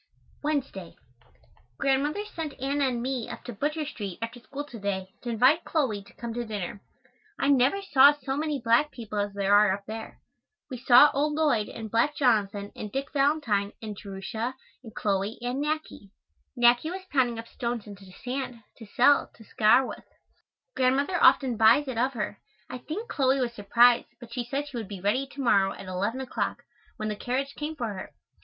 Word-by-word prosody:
Wednesday. 275 Hz, -, -3 dB, 0.8 s
Grandmother 290 Hz, +9 st, 0 dB
sent 320 Hz, -8 st, -6 dB
Anna 275 Hz, +1 st, 0 dB
and 240 Hz, -2 st, -2 dB
me 255 Hz, -3 st, -3 dB
up -, -, -8 dB
to 245 Hz, -, -7 dB
Butcher 300 Hz, +7 st, -2 dB
Street 205 Hz, -, -6 dB
after 230 Hz, +2 st, -5 dB
school 280 Hz, +4 st, -7 dB
to 245 Hz, -6 st, -10 dB
day 190 Hz, -2 st, -3 dB
to 245 Hz, -, -5 dB
invite 255 Hz, +8 st, +4 dB
Chloe 260 Hz, -11 st, -1 dB
to 200 Hz, -, -18 dB
come 235 Hz, -1 st, -6 dB
to 240 Hz, +1 st, -3 dB
dinner. 205 Hz, -3 st, -5 dB, 0.6 s
I 275 Hz, -, +1 dB
never 280 Hz, +8 st, +3 dB
saw 285 Hz, -6 st, +7 dB
so 270 Hz, -2 st, -4 dB
many 300 Hz, -1 st, -1 dB
black 235 Hz, +5 st, +3 dB
people 220 Hz, -6 st, -6 dB
as 205 Hz, 0 st, -1 dB
there 200 Hz, 0 st, +1 dB
are 205 Hz, -1 st, +6 dB
up 200 Hz, +1 st, -4 dB
there. 220 Hz, +1 st, -8 dB, 0.5 s
We 255 Hz, -, -5 dB
saw 250 Hz, +3 st, +7 dB
old 295 Hz, +2 st, +1 dB
Lloyd 290 Hz, -9 st, +1 dB
and 220 Hz, -2 st, -8 dB
black 235 Hz, +6 st, +2 dB
Jonathan 205 Hz, -6 st, +1 dB
and 210 Hz, -, -7 dB
Dick 270 Hz, +5 st, -4 dB
Valentine 275 Hz, -9 st, +1 dB
and 215 Hz, -2 st, -6 dB
Jerusha 210 Hz, +5 st, -5 dB, 0.3 s
and 225 Hz, -3 st, -12 dB
Chloe 200 Hz, +2 st, -1 dB
and 245 Hz, +4 st, -2 dB
Nackie. 305 Hz, -9 st, -4 dB, 0.5 s
Nackie 240 Hz, +5 st, +4 dB
was 375 Hz, +2 st, -6 dB
pounding 245 Hz, -4 st, +2 dB
up 225 Hz, 0 st, -7 dB
stones 235 Hz, -2 st, -4 dB
into 200 Hz, -2 st, -11 dB
sand, 250 Hz, +2 st, -5 dB
to 225 Hz, -, -11 dB
sell, 265 Hz, +7 st, +4 dB
to 225 Hz, -, -15 dB
scour 225 Hz, +4 st, +4 dB
with. -, -, -8 dB, 0.7 s
Grandmother 275 Hz, +7 st, +1 dB
often 255 Hz, -4 st, +5 dB
buys 225 Hz, +7 st, +5 dB
it 250 Hz, -3 st, -3 dB
of 260 Hz, +3 st, +1 dB
her. 210 Hz, -4 st, -4 dB, 0.3 s
I 255 Hz, -, -5 dB
think 360 Hz, -, -6 dB
Chloe 270 Hz, -, +1 dB
was 245 Hz, -2 st, -1 dB
surprised, 235 Hz, +3 st, +4 dB
but 235 Hz, -1 st, -11 dB
she 245 Hz, -1 st, -3 dB
said 280 Hz, +4 st, -3 dB
she 270 Hz, -4 st, -7 dB
would 220 Hz, -4 st, -5 dB
be 200 Hz, -1 st, -7 dB
ready, 210 Hz, +9 st, 0 dB
to 280 Hz, +1 st, -8 dB
morrow, 200 Hz, -6 st, +3 dB
at 195 Hz, -, -10 dB
eleven 195 Hz, +8 st, -2 dB
o'clock, 260 Hz, -, -3 dB, 0.3 s
when 215 Hz, -, -3 dB
the 210 Hz, -, -2 dB
carriage 260 Hz, +6 st, -2 dB
came 305 Hz, +1 st, -5 dB
for 235 Hz, -6 st, -3 dB
her. 185 Hz, -, -9 dB
245 Hz, 190 wpm, -27 LUFS, 215-275 Hz, 0.8 s, saw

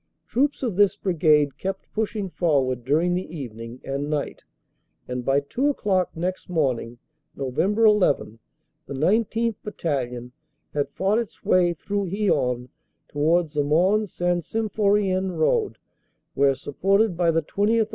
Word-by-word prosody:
Troops 280 Hz, +3 st, 0 dB
of 225 Hz, -8 st, -2 dB
this 205 Hz, -2 st, +4 dB
Brigade 150 Hz, -6 st, +2 dB
kept 190 Hz, 0 st, -5 dB
pushing 210 Hz, -2 st, -2 dB
forward 135 Hz, -9 st, +1 dB
during 160 Hz, +7 st, +2 dB
the 175 Hz, -2 st, -4 dB
evening 115 Hz, -2 st, -8 dB
and 140 Hz, +2 st, -3 dB
night, 150 Hz, -2 st, -3 dB, 0.6 s
and 125 Hz, 0 st, -4 dB
by 135 Hz, +2 st, +3 dB
two 245 Hz, -, -1 dB
o 290 Hz, -, +3 dB
clock 185 Hz, -3 st, +1 dB
next 180 Hz, +3 st, -3 dB
morning, 130 Hz, -8 st, -1 dB, 0.4 s
Nov. 130 Hz, -2 st, -4 dB
11, 210 Hz, -, +3 dB, 0.5 s
the 140 Hz, -, -5 dB
19th. 220 Hz, +7 st, +1 dB
Battalion 125 Hz, -, -3 dB, 0.4 s
had 145 Hz, -1 st, -1 dB
fought 195 Hz, +8 st, +1 dB
its 235 Hz, -4 st, -7 dB
way 175 Hz, -2 st, +3 dB
through 200 Hz, +3 st, -3 dB
Hyon 130 Hz, -, 0 dB, 0.4 s
towards 160 Hz, +2 st, +1 dB
the 145 Hz, -1 st, +1 dB
Mons 185 Hz, +8 st, +2 dB
St. 175 Hz, -1 st, 0 dB
Sym 220 Hz, +3 st, -2 dB
phorien 195 Hz, -3 st, +1 dB
road, 420 Hz, -, +1 dB, 0.6 s
where, 140 Hz, 0 st, +3 dB
supported 195 Hz, -, +1 dB
by 170 Hz, 0 st, +2 dB
the 165 Hz, -1 st, +2 dB
20th. 215 Hz, +6 st, +1 dB
175 Hz, 140 wpm, -24 LUFS, 140-205 Hz, 0.6 s, this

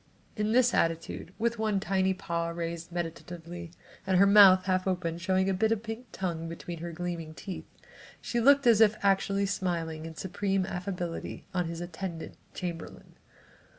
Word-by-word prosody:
In 210 Hz, 0 st, 0 dB
this 245 Hz, 0 st, +4 dB
attitude, 165 Hz, +1 st, -1 dB
with 235 Hz, 0 st, 0 dB
one 215 Hz, -2 st, +1 dB
tiny 190 Hz, 0 st, +1 dB
paw 170 Hz, -2 st, -2 dB
raised 170 Hz, 0 st, -5 dB
meditatively, 170 Hz, 0 st, -6 dB, 0.4 s
and 190 Hz, -1 st, +3 dB
her 195 Hz, -, +7 dB
mouth 200 Hz, -2 st, +8 dB
half 185 Hz, 0 st, +1 dB
open 170 Hz, -3 st, -1 dB
showing 190 Hz, +2 st, +1 dB
a 195 Hz, -, +2 dB
bit 220 Hz, +4 st, +1 dB
of 225 Hz, -1 st, 0 dB
pink 225 Hz, +2 st, -6 dB
tongue 165 Hz, -3 st, -3 dB
between 170 Hz, 0 st, -7 dB
her 170 Hz, +1 st, -5 dB
gleaming 165 Hz, -2 st, -5 dB
teeth, 190 Hz, +1 st, -7 dB, 0.5 s
she 240 Hz, -, -2 dB
looked 280 Hz, +3 st, +5 dB
as 230 Hz, -2 st, +6 dB
if 215 Hz, -1 st, +6 dB
actually 195 Hz, 0 st, +2 dB
smiling 165 Hz, -5 st, -2 dB
in 160 Hz, -, -9 dB
supreme 190 Hz, +2 st, -1 dB
affability 180 Hz, -2 st, -5 dB
on 180 Hz, -3 st, 0 dB
an 170 Hz, +1 st, -5 dB
attendant 175 Hz, -1 st, -6 dB, 0.2 s
chamberlain. 170 Hz, -2 st, -6 dB
185 Hz, 160 wpm, -29 LUFS, 170-200 Hz, 0.5 s, mouth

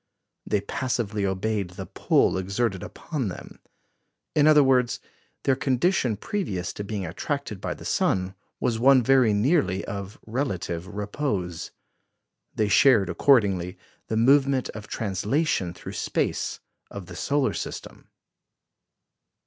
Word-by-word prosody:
They 105 Hz, -, +1 dB
passively 105 Hz, -2 st, -2 dB
obeyed 100 Hz, 0 st, -1 dB
the -, -, -5 dB
pull -, -, +2 dB
exerted 95 Hz, +1 st, -1 dB
upon 145 Hz, -9 st, -4 dB
them. 90 Hz, -, -8 dB, 0.7 s
In 150 Hz, 0 st, +4 dB
other 150 Hz, -1 st, +7 dB
words, 125 Hz, -3 st, +2 dB, 0.4 s
their 135 Hz, -, +3 dB
condition 130 Hz, -, +1 dB
previous 105 Hz, -, -3 dB
to 105 Hz, -, -5 dB
being 100 Hz, -2 st, -4 dB
attracted 105 Hz, -, -4 dB
by -, -, -3 dB
the -, -, -12 dB
sun 95 Hz, 0 st, 0 dB, 0.3 s
was 115 Hz, -2 st, 0 dB
one 130 Hz, +1 st, +6 dB
very 130 Hz, -2 st, +4 dB
nearly 105 Hz, -, +1 dB
of 100 Hz, 0 st, -6 dB
relative 95 Hz, -, -3 dB
repose. 100 Hz, -, -3 dB, 0.9 s
They 110 Hz, -, +1 dB
shared, 105 Hz, -4 st, +5 dB
accordingly, 95 Hz, -5 st, +3 dB, 0.3 s
the 110 Hz, -, -1 dB
movement 135 Hz, +2 st, +3 dB
of 110 Hz, -1 st, -8 dB
translation 105 Hz, -, -1 dB
through -, -, -9 dB
space -, -, -2 dB, 0.3 s
of 100 Hz, -2 st, -8 dB
the 90 Hz, 0 st, -10 dB
solar 135 Hz, +3 st, 0 dB
system. -, -, -7 dB
110 Hz, 125 wpm, -25 LUFS, 95-135 Hz, 0.9 s, other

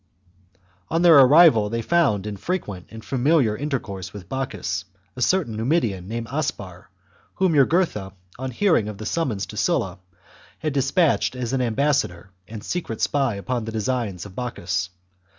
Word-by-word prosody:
On 165 Hz, +2 st, +1 dB
their 165 Hz, -4 st, +8 dB
arrival 135 Hz, -6 st, +7 dB
they 115 Hz, +1 st, -2 dB
found 125 Hz, -, +2 dB
in 105 Hz, -1 st, -4 dB
frequent 100 Hz, -, -4 dB
and 110 Hz, 0 st, -11 dB
familiar 135 Hz, -2 st, +2 dB
chap. -, -, -5 dB
CVIII -, -, -11 dB
intercourse 100 Hz, -, -4 dB
with 100 Hz, -4 st, -10 dB
Bocchus 95 Hz, -7 st, -3 dB, 0.3 s
a 125 Hz, -, -7 dB
certain 150 Hz, -, +1 dB
Numidian, 110 Hz, -, 0 dB
named 115 Hz, +2 st, -4 dB
Aspar, 105 Hz, -, -4 dB, 0.5 s
whom 190 Hz, -3 st, +2 dB
Jugurtha, 140 Hz, -, +2 dB, 0.3 s
on 130 Hz, 0 st, -3 dB
hearing 160 Hz, -, +2 dB
of 105 Hz, -2 st, -6 dB
the 110 Hz, -, -7 dB
summons 120 Hz, -7 st, -1 dB
to -, -, -10 dB
Sulla, 95 Hz, 0 st, 0 dB, 0.6 s
had 155 Hz, -3 st, -3 dB
despatched 140 Hz, +1 st, +2 dB
as 125 Hz, -1 st, -3 dB
an 135 Hz, -, +1 dB
ambassador 115 Hz, -7 st, 0 dB, 0.2 s
and 110 Hz, -1 st, -8 dB
secret 160 Hz, -11 st, -4 dB
spy 135 Hz, -6 st, +1 dB
upon 115 Hz, +3 st, -3 dB
the 110 Hz, -, -5 dB
designs 110 Hz, -4 st, -2 dB
of 100 Hz, -, -11 dB
Bocchus. 95 Hz, -7 st, -3 dB
120 Hz, 160 wpm, -23 LUFS, 105-145 Hz, 0.6 s, their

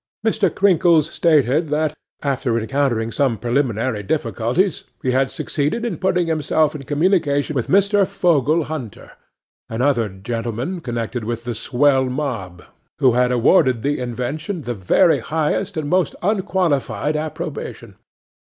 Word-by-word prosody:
'MR. 220 Hz, -3 st, +2 dB
CRINKLES 170 Hz, -5 st, +3 dB
stated 155 Hz, -1 st, +2 dB
that, 150 Hz, 0 st, 0 dB, 0.3 s
after 135 Hz, -4 st, 0 dB
encountering 115 Hz, -1 st, 0 dB
some 130 Hz, -2 st, +1 dB
preliminary 120 Hz, -2 st, -1 dB
difficulties, 125 Hz, -, -1 dB, 0.2 s
he 130 Hz, -, +1 dB
had 130 Hz, +1 st, +2 dB
succeeded 155 Hz, +11 st, -2 dB
in 195 Hz, -10 st, -3 dB
putting 180 Hz, -1 st, +1 dB
himself 155 Hz, -1 st, +1 dB
in 150 Hz, -, -7 dB
communication 150 Hz, 0 st, +1 dB
with 125 Hz, -, -1 dB
Mr. 200 Hz, 0 st, +3 dB
Fogle 165 Hz, -5 st, +2 dB
Hunter, 145 Hz, -, -7 dB, 0.6 s
and 115 Hz, +2 st, -2 dB
other 120 Hz, -6 st, +2 dB
gentlemen 115 Hz, -, -4 dB
connected 115 Hz, -3 st, -4 dB
with 115 Hz, +1 st, -4 dB
the 120 Hz, 0 st, -3 dB
swell 130 Hz, +3 st, +2 dB
mob, 120 Hz, -10 st, -4 dB, 0.3 s
who 130 Hz, -3 st, +4 dB
had 125 Hz, +1 st, +2 dB
awarded 125 Hz, 0 st, +3 dB
the 145 Hz, +1 st, 0 dB
invention 130 Hz, -, -4 dB
the 120 Hz, -, -3 dB
very 120 Hz, -, +3 dB
highest 155 Hz, 0 st, -2 dB
and 155 Hz, -2 st, -2 dB
most 180 Hz, +2 st, +1 dB
unqualified 180 Hz, -, 0 dB
approbation. 155 Hz, 0 st, -5 dB
140 Hz, 135 wpm, -20 LUFS, 120-165 Hz, 0.6 s, who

